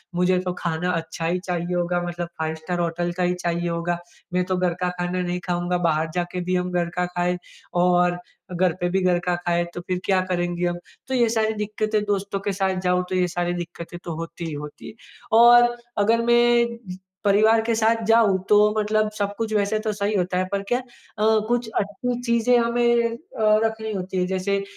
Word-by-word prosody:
मुझे 180 +1 +2
तो 180 - -1
खाना 170 +1 -1
अच्छा 165 -1 -3
ही 175 +2 0
चाहिए 180 -1 -3
होगा, 175 0 0
मतलब 175 0 -4
5 160 0 -1
स्टार 175 +3 -4
होटल 175 +1 -1
का 180 - +1
ही 180 - +2
चाहिए 175 -1 -2
होगा। 170 +1 -2 0.3
मैं 180 0 +2
तो 185 0 -1
घर 180 -1 +1
का 180 - +2
खाना 175 +1 -1
नहीं 180 0 -2
खाऊँगा, 175 0 0
बाहर 160 -2 +1
जाके 175 0 -2
भी 185 - +1
हम 180 0 -1
घर 175 -1 0
का 180 - +2
खाएँ 180 0 -1 0.5
और 180 0 +3 0.4
घर 180 -1 +2
पे 175 - 0
भी 190 +2 +1
घर 180 -1 +3
का 180 -1 +1
खाएँ 175 -1 0
तो 175 - -5
फिर 180 -1 -1
क्या 190 -1 +3
करेंगे 175 0 -1
हम? 175 - -2 0.3
तो 265 - -3
ये 240 -2 +3
सारी 220 -1 +1
दिक्कतें, 215 0 -1
दोस्तों 200 -1 -1
के 200 +1 -2
साथ 190 0 0
जाऊँ, 180 0 +1
तो 185 - -1
ये 180 -1 +2
सारी 175 0 -2
दिक्कतें 175 0 -7
तो 170 - -5
होती 165 +1 -6
ही 160 - -4
होती 150 0 -8
है। - - -11 0.5
और 240 0 +7 0.2
अगर 225 +3 +3
मैं 240 0 +3 0.5
परिवार 215 +3 +5
के 230 0 0
साथ 225 +1 +2
जाऊँ, 225 -4 +4
तो 210 0 +5
मतलब 215 0 +1
सब 200 0 -1
कुछ 225 -1 -2
वैसे 210 +1 +1
तो 215 -1 -2
सही 205 +1 -1
होता 180 -1 0
है, 185 - +1
पर 200 0 -1
क्या 245 - +2
अ, - - -9 0.4
कुछ 220 +2 +2
अच्छी 240 +5 -3
चीज़ें 235 0 +3
हमें 235 0 +2
अ, - - -10 0.5
रखनी 220 0 -3
होती 185 0 -4
है। 180 - +2
जैसे 195 +1 -1
185 Hz, 210 wpm, -23 LUFS, 175-215 Hz, 0.5 s, और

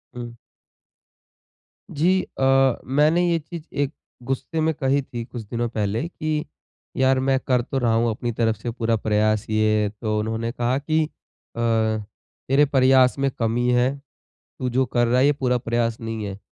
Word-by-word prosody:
हुँ। 120 -1 -6 1.6
जी 180 +5 +2 0.2
अ, 135 -1 +4
मैंने 155 +6 +3
ये 170 -1 +2
चीज़ 165 +1 -9
एक 140 -1 0 0.3
गुस्से 135 +5 -3
में 160 +1 +2
कही 140 -2 +1
थी 120 -3 -6
कुछ 120 0 -7
दिनों 120 +3 -2
पहले 110 +5 -2
की 155 -2 -3 0.5
यार 130 0 +3
मैं 135 0 +2
कर 125 -2 +1
तो 130 +3 -4
रहा 120 -3 +2
हूँ 115 +1 +2
अपनी 120 +2 -2
तरफ 115 -1 0
से 110 +3 -5
पूरा 115 -1 0
प्रयास 110 -1 +1
ये। 110 -1 +2
तो 110 -2 -1
उन्होंने 110 +2 -2
कहा 120 +2 0
कि, 155 +3 +1
"अ, - - -11 1.4
तेरे 140 +3 +4
प्रयास 130 -2 +4
में 135 0 +2
कमी 115 +1 +1
है। 125 +1 +3 0.7
तू 130 - -2
जो 130 +2 +2
कर 120 0 +1
रहा 120 +2 +2
है 135 - +5
ये 145 - +5
पूरा 125 -3 0
प्रयास 115 -1 -1
नहीं 115 -1 -4
है। 100 -1 -6
125 Hz, 170 wpm, -23 LUFS, 115-135 Hz, 1.6 s, है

